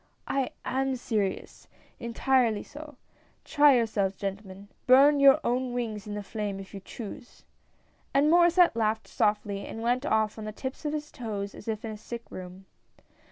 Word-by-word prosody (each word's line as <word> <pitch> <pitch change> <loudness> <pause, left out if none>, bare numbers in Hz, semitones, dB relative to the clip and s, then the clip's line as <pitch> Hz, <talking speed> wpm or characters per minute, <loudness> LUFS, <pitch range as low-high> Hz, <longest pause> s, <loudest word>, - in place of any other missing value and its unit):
" - - -43
I 255 - -2 0.2
am 265 0 0
serious, 215 -6 -3 0.3
entirely 235 -2 +1
so. 300 0 -11 0.5
Try 290 -2 +5
yourselves, 210 -5 0
gentle 195 +1 -5
man, 195 +2 -12 0.2
burn 280 +3 +7
your 275 +1 +7
own 250 0 -1
wings 220 -4 -4
in 205 - -5
the 205 - -4
flame 205 -1 -4
if 195 +1 -11
you 200 - -6
choose." 230 +5 -10 0.7
And 285 +3 +3
Maurdsset 345 -2 +5
laughed 220 -1 0
softly 210 -1 0
and 225 - -7
went 245 +2 +1
off 220 -6 0
on 215 - -6
the 215 - -4
tips 260 +7 -7
of 295 - -1
his 300 0 -4
toes 205 -4 -5
as - - -12
if 220 0 -3
in 220 - -4
a 215 - -7
sick 235 +2 -7
room. 185 +1 -9
225 Hz, 175 wpm, -28 LUFS, 205-265 Hz, 0.7 s, burn